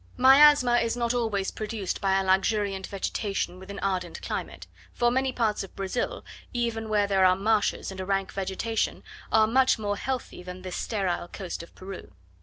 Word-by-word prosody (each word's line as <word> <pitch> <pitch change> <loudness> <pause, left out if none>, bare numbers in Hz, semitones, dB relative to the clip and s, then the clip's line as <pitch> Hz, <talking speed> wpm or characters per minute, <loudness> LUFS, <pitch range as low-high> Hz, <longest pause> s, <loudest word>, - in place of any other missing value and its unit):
Miasma 265 -1 +7
is 230 0 0
not 235 0 0
always 220 -5 -1
produced 215 -3 -4
by 195 -1 +2
a - - 0
luxuriant 195 0 +1
vegetation 195 -1 -3
with 190 +1 -12
an 200 - -6
ardent 185 -3 -2
climate; - - -5 0.3
for 240 0 +2
many 260 +1 +1
parts 225 -5 0
of 195 - -12
Brazil, 245 - -3 0.3
even 230 -2 -2
where 210 -1 +3
there 195 -1 +2
are 185 0 +6
marshes 205 +1 0
and 190 - -8
a 185 - -3
rank 195 -1 -1
vegetation, 195 +4 -2 0.3
are 220 -1 +5
much 255 +4 +3
more 205 -2 -2
healthy 260 -6 -4
than 180 0 -9
this 185 -1 -5
sterile 190 -6 -2
coast 180 -2 -6
of 170 - -14
Peru. 185 - -9
205 Hz, 180 wpm, -27 LUFS, 190-235 Hz, 0.3 s, Miasma